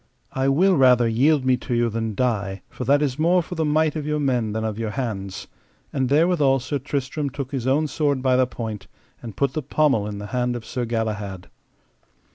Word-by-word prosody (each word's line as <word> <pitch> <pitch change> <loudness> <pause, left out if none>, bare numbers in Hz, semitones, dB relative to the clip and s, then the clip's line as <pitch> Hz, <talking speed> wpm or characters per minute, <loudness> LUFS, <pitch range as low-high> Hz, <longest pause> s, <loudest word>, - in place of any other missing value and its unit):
I 135 +1 +1
will 180 +6 +3
rather 125 -3 +5
yield 135 +5 +2
me 130 -1 +3
to 125 0 -3
you 120 0 +2
than 110 -1 -3
die 100 -5 -1
for 125 - -6
that 145 +4 +3
is 140 -1 -2
more 175 +3 +3
for 170 - -8
the 160 -2 -1
might 155 0 +2
of 150 -1 -4
your 150 0 0
men 125 -6 0
than 110 +1 -2
of 110 -1 -3
your 115 -1 -2
hands. 105 -6 -4 0.5
And 130 -2 0
therewithal 150 -3 +3
Sir 140 +3 -3
Tristram 140 +2 -3
took 135 -1 -6
his 130 -3 -3
own 145 +4 +2
sword 145 -3 -1
by 130 -1 +3
the 130 0 +3
point, 110 -5 -6 0.3
and 110 -5 -9
put 140 -2 +1
the 155 - -2
pommel 135 -6 +1
in 105 -1 -5
the 100 - -6
hand 125 -1 0
of 115 -2 -7
Sir 125 -1 -3
Galahad. 105 -5 -3
130 Hz, 215 wpm, -23 LUFS, 115-145 Hz, 0.5 s, rather